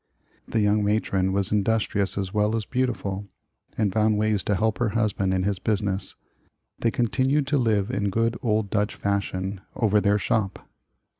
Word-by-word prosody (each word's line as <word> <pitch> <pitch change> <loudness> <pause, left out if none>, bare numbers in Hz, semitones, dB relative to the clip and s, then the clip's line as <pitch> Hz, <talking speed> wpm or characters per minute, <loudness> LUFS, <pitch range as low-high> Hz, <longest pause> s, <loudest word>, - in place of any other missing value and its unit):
The 110 - 0
young 105 0 +3
matron 100 -2 +1
was 100 0 0
industrious 105 -2 +1
as 95 -1 -3
well 105 +1 +2
as 110 -2 -2
beautiful, 105 -6 -2 0.5
and 105 -4 +1
found 110 0 +2
ways 105 -1 +1
to 105 - +1
help 110 +3 0
her 120 -3 +1
husband 100 -3 +1
in 95 0 +1
his 100 -1 0
business. 100 -1 -1 0.6
They 115 - +2
continued 130 +5 +1
to 145 -1 +2
live 110 -3 +1
in 100 -4 0
good 115 +3 +1
old 110 -3 0
Dutch 105 -1 0
fashion 100 -1 -2
over 105 -2 +2
their 100 +1 +3
shop. 105 -2 -1
105 Hz, 165 wpm, -25 LUFS, 100-110 Hz, 0.6 s, young